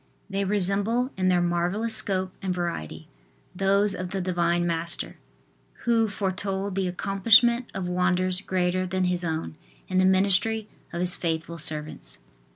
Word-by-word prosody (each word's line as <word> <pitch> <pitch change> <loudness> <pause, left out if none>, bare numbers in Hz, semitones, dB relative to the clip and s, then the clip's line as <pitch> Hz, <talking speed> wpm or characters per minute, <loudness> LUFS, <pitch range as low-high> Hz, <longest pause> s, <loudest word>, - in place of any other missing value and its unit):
They 195 0 -1
resemble 205 +6 +1
in 185 -1 0
their 180 -1 +3
marvellous 175 +6 0
scope 185 -1 +1
and 185 -2 -2
variety, 170 - -4 0.5
those 195 +2 +2
of 180 -1 -5
the 195 +1 -3
Divine 175 -1 0
Master, 170 0 -2 0.7
who 230 -2 +3
foretold 195 0 -3
the 190 0 -1
accomplishment 225 +6 +4
of 190 -2 -3
wonders 180 +1 +1
greater 185 -1 0
than 185 +1 -1
His 180 0 0
own 160 - -3 0.3
in 185 - +1
the 185 - +4
ministry 200 +3 +2 0.2
of 170 - -3
His 180 0 +1
faithful 165 0 -3
servants. 150 - -1
185 Hz, 145 wpm, -26 LUFS, 175-200 Hz, 0.7 s, accomplishment